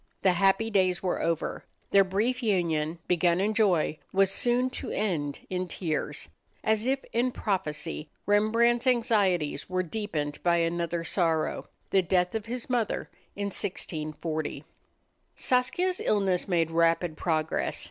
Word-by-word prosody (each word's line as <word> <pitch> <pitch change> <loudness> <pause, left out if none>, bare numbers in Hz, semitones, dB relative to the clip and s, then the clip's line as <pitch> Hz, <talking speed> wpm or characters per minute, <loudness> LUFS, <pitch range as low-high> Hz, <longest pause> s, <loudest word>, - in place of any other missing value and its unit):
The 190 - +5
happy 195 +5 +2
days 185 -2 +2
were 185 - 0
over. 165 -1 -1 0.3
Their 200 0 +7
brief 215 +7 0
union, 170 -7 0
begun 175 0 +3
in 205 +3 +1
joy, 185 -8 +2
was 195 0 +3
soon 250 +3 +2
to - - -6
end 155 -9 -1
in 185 0 -2
tears. 155 - -3 0.4
As 220 +2 +1
if 270 +1 0
in 245 +2 +2
prophecy, 165 -7 -3 0.2
Rembrandt's 230 +4 +3
anxieties 205 -12 +1
were 185 0 0
deepened 165 -6 -3
by 170 -1 +3
another 170 0 -1
sorrow 165 -2 0 0.2
the 195 - +5
death 180 0 +1
of 220 -1 -3
his 245 +1 -4
mother 240 -4 -1 0.2
in 200 0 -2
1640. 155 -5 -3 0.7
Saskia's 350 +9 +1
illness 195 -4 +1
made 165 -3 +1
rapid 165 0 +2
progress. 160 -2 -1
185 Hz, 135 wpm, -28 LUFS, 165-220 Hz, 0.7 s, Their